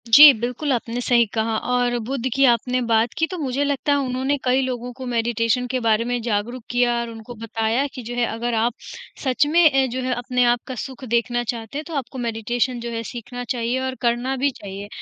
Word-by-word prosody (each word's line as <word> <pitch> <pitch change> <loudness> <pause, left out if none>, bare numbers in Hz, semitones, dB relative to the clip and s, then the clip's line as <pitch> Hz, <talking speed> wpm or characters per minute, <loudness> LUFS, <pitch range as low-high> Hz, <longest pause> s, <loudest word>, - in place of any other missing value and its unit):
जी, 290 +6 +11
बिल्कुल 250 +5 -3
आपने 240 0 -2
सही 240 -1 +4
कहा 225 0 0 0.2
और 245 -1 +2
बुद्ध 260 0 -2
की 275 0 +5
आपने 250 +2 0
बात 230 0 +2
की 325 - +3
तो 365 - -4
मुझे 280 -3 -1
लगता 285 0 0
है 285 - +4
उन्होंने 260 +3 0
कई 255 +1 +3
लोगों 250 -1 -3
को 260 +1 -8
मेडिटेशन 235 0 0
के 260 - 0
बारे 225 -1 +2
में 245 -1 -1
जागरूक 230 +2 -2
किया 245 0 +2
और 235 0 -3
उनको 225 +1 -9
बताया 225 +3 0
कि 255 -2 -7
जो 240 +2 -6
है 245 -1 +2
अगर 235 +1 -3
आप 225 +2 +1 0.5
सच 260 +1 +2
में 295 -5 +4
जो 255 +2 -3
है 255 0 0
अपने 245 +1 0
आप 240 - -3
का 260 - -5
सुख 265 -1 -10
देखना 240 +1 +1
चाहते 235 +1 -5
हैं 300 - -3
तो 335 - -8
आपको 265 -1 -4
मेडिटेशन 240 +2 -1
जो 235 0 -5
है 230 0 -3
सीखना 245 +1 -7
चाहिए 245 +1 -1
और 260 0 -3
करना 240 +2 0
भी 280 +2 +2
चाहिए 200 -3 -8
245 Hz, 220 wpm, -22 LUFS, 230-260 Hz, 0.5 s, जी